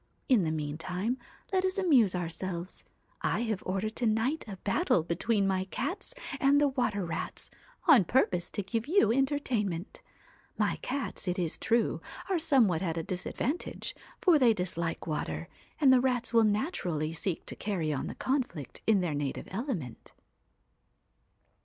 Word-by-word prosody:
In 250 -6 +5
the 160 - 0
meantime 170 - -2 0.3
let 375 -1 +3
us 375 +1 0
amuse 265 - +4
ourselves. 175 +1 -4 0.4
I - - 0
have 220 -5 -1
ordered 195 +4 -1
to 240 - +1
night 225 +8 +1
a 200 -2 -6
battle 190 -4 +2
between 200 +5 +1
my 190 -1 +1
cats 285 - -3 0.2
and 280 +2 +5
the 290 -1 +4
water 210 -8 0
rats, 165 - -5 0.3
on 270 - +7
purpose 180 -6 +2
to 205 - -2
give 225 +5 -2
you 315 - +4
entertainment. 240 - -1 0.6
My - - +1
cats, 265 -6 -4
it 180 - 0
is 170 -4 -1
true, 230 0 +1 0.3
are 365 - +2
somewhat 245 - +3
at 170 -3 -1
a 165 - -1
disadvantage, 230 - -3 0.2
for 345 -5 +5
they 235 -4 +5
dislike 170 -3 -2
water, 85 - -3 0.3
and 275 -4 +6
the 255 - +5
rats 250 -2 0
will 230 -1 +6
naturally 185 - -1
seek 170 +1 -3
to - - -5
carry 175 -7 -1
on 135 - -2
the - - -6
conflict 245 - -2
on 205 -4 +5
their 175 -4 -1
native 145 -2 -3
element.' 195 - -4
210 Hz, 155 wpm, -30 LUFS, 175-260 Hz, 0.6 s, on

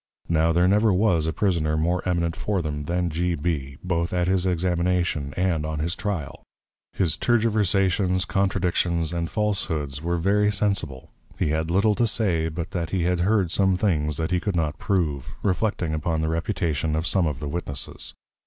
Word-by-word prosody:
Now 80 0 +3
there 90 +2 +3
never 105 +3 +4
was 90 -5 +2
a - - +1
Prisoner 80 -4 0
more 85 +3 +1
eminent 85 -2 0
for 100 -4 -1
them, 75 -1 -4
than 85 +1 -1
G. 85 +2 0
B. 70 -4 -3
both 85 -1 -1
at 90 -1 +1
his 95 0 +1
Examination 85 -4 0
and 90 -4 +1
on 80 0 -3
his 85 +4 -1
Trial. 95 -9 -4 0.5
His 85 -4 +1
Tergiversations, 100 -5 +2
Contradictions, 90 -4 0
and 85 -1 -2
Falshoods, 80 -10 -1
were 85 +1 -1
very 105 +4 +2
sensible: 100 -10 -1 0.3
he - - 0
had 80 +1 -1
little 100 +5 +3
to 115 +3 +1
say, 90 -8 +1
but 85 +4 -5
that 85 -3 -2
he 90 0 0
had 90 0 +1
heard 95 -1 +2
some 95 -1 +2
things 75 -7 0
that 80 +1 -2
he 90 - +2
could 100 +1 -2
not 75 -3 -1
prove, 80 -9 -1
Reflecting 95 -4 0
upon 80 +1 -1
the 80 - 0
Reputation 80 -2 -1
of 80 +2 -1
some 90 -2 +2
of 75 -4 -3
the 75 - -5
Witnesses. 70 -2 -5
85 Hz, 180 wpm, -24 LUFS, 80-95 Hz, 0.5 s, never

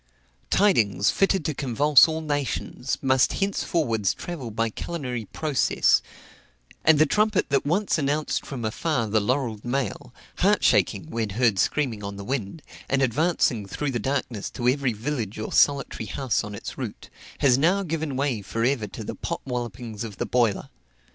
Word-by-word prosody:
Tidings, 105 - +3
fitted 195 - +1
to 155 - 0
convulse 140 +3 +5
all 160 0 -3
nations, 145 -3 -2
must 130 -1 +3
henceforwards 150 - 0
travel 155 -9 -6
by 115 +1 -1
culinary 125 -6 -4
process; 150 +5 +2 0.8
and 160 -1 +6
the 155 - +6
trumpet 210 +5 +1
that 140 0 +1
once 185 +2 +1
announced 145 +1 -1
from 125 -5 -5
afar 125 +3 -1
the 110 0 +2
laurelled 115 -1 -1
mail, 125 -3 -3 0.3
heart - - +3
shaking, - - +2
when 115 -2 -2
heard 110 -1 +2
screaming 125 -8 0
on 100 0 -5
the 100 - -7
wind, 130 +4 -4 0.3
and 135 0 +2
advancing 130 - +1
through 145 +7 -3
the 120 - -2
darkness 125 -4 -2
to 120 - -3
every 135 0 +2
village 115 -2 -3
or 110 - -5
solitary 140 -6 +2
house 130 -2 -1
on 105 -1 -6
its - - -8
route, - - -7 0.3
has 130 -2 +4
now 185 +7 +3
given 160 -5 -3
way 135 -5 0
for 115 +4 -3
ever 125 -4 +1
to - - -8
the - - -5
pot - - -4
wallopings 120 -3 -5
of 105 -4 -7
the - - -2
boiler. 120 -5 +1
130 Hz, 165 wpm, -25 LUFS, 110-150 Hz, 0.8 s, and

